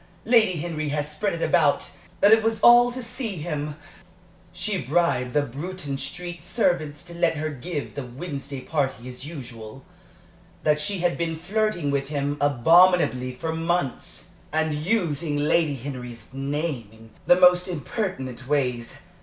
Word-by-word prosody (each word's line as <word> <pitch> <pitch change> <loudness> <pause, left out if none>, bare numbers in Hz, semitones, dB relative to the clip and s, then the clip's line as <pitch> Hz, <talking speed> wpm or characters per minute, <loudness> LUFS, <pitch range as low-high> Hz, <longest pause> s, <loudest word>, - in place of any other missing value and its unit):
Lady 225 -5 +5
Henry 155 -2 -3
has 150 +1 -2
spread 195 +6 -1
it 165 - -3
about - - +2 0.3
that 205 - +6
it 220 - +6
was 225 0 0
all 240 0 +7
to 255 +1 -5
see 230 -3 -3
him 150 -2 -4 0.8
she 185 +2 -2
bribed 135 -3 +1
the 150 -1 +3
Bruton 145 +3 -5
Street 175 -1 -6
servants 160 -8 0
to 170 0 -9
let 170 -1 +1
her 155 +1 -2
give 145 +2 -5
the 140 - -5
Wednesday 140 +1 -6
party 135 -5 -2
as 125 +3 -8
usual 125 -5 -9 0.8
that 150 0 +3
she 185 +4 -2
had 175 -1 0
been 165 -1 -1
flirting 175 -3 -1
with 140 -1 -1
him 145 -1 -1
abominably 145 -2 +4
for 160 +5 -3
months, 165 -4 -2 0.2
and 160 0 +1
using 155 -3 0
Lady 150 0 +2
Henry's 125 -3 -7
name 140 -3 -3
in 110 0 -16 0.2
the 175 - +6
most 180 0 +6
impertinent 155 - -4
ways. 125 -5 -1
155 Hz, 150 wpm, -25 LUFS, 135-180 Hz, 0.8 s, all